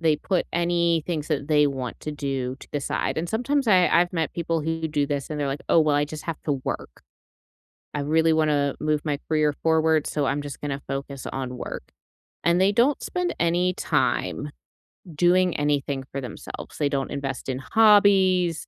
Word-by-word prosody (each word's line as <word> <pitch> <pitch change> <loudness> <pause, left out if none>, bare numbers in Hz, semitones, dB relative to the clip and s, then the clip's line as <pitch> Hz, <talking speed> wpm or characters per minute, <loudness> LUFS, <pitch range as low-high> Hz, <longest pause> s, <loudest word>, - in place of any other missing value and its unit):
They 160 -2 +3
put 185 -3 -1
any 170 -1 +1
things 155 -3 -3
that 145 -2 -2
they 150 -1 +4
want 130 -4 -4
to 155 - -5
do 135 -3 -3
to - - -13
the 145 - -1
side, 140 - -2
and 170 - -3
sometimes 250 +5 0
I 185 -3 +5
I've 175 +1 +3
met 165 -3 -1
people 165 -1 -1
who 160 +1 -2
do 145 -2 0
this, 140 0 -3
and 150 - -3
they're 145 - -1
like, 140 +1 -3
oh, 165 - +5
well, 150 -2 +3
I 145 - +2
just 150 +1 -8
have 165 -2 -4
to 145 - +1
work. - - -5 0.9
I 145 - -1
really 160 +2 +3
wanna 150 -3 +1
move 150 -1 0
my 145 -2 -1
career 155 -2 +2
forward, 160 -1 +3
so 145 -2 -1
I'm 140 +2 0
just 145 -2 -7
gonna 140 -1 -3
focus 135 -1 -5
on 130 -1 -4
work, - - -6 0.6
and 170 +1 +3
they 195 +1 +4
don't 250 +6 +3
spend 360 -1 -2
any 175 +2 +2
time 150 -2 -1 0.7
doing 180 +2 +3
anything 145 -2 0
for 140 - -3
themselves. 125 - -8
They 145 -2 +1
don't 135 -1 -2
invest 135 -2 -4
in 130 0 -2
hobbies. 190 -3 +4
155 Hz, 195 wpm, -24 LUFS, 140-170 Hz, 0.9 s, I